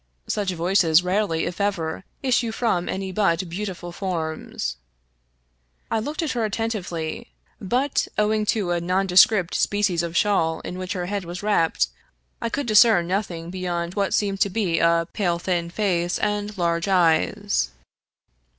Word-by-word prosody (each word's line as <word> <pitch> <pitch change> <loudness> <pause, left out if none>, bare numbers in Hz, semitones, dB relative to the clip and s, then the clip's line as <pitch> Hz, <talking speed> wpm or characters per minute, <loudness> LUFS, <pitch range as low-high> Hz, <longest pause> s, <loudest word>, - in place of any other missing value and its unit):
Such 205 -2 -1
voices 175 -1 +3
rarely, 180 -3 0
if 175 +3 -4
ever, 185 -4 -1 0.2
issue 245 -3 +1
from 220 -7 0
any 190 0 -3
but 185 -2 +1
beautiful 180 -1 -5
forms. 160 - -4 1.1
I 225 - +2
looked 295 +9 -3
at 310 - -1
her 235 -2 -1
attentively, 195 -7 -3 0.3
but, 255 +8 0
owing 215 0 +1
to 200 -6 +1
a 175 -1 0
nonde 180 +1 0
script 195 -6 +5
species 205 -4 +1
of 170 0 -3
shawl 165 -6 +2
in 180 - -6
which 185 +1 -3
her 180 -2 -3
head 200 +1 -3
was 175 +2 -7
wrapped, 205 -6 +2 0.5
I 230 - -1
could 280 +4 -2
discern 215 -4 +5
nothing 175 -3 -3
beyond 175 -2 -3
what 200 -1 0
seemed 200 -2 0
to 200 - +4
be 185 -4 0
a 170 0 +3
pale, 175 -4 0
thin 170 -1 -1
face 175 -2 0
and 210 0 -2
large 170 0 0
eyes. 160 - +2
185 Hz, 150 wpm, -23 LUFS, 170-210 Hz, 1.1 s, script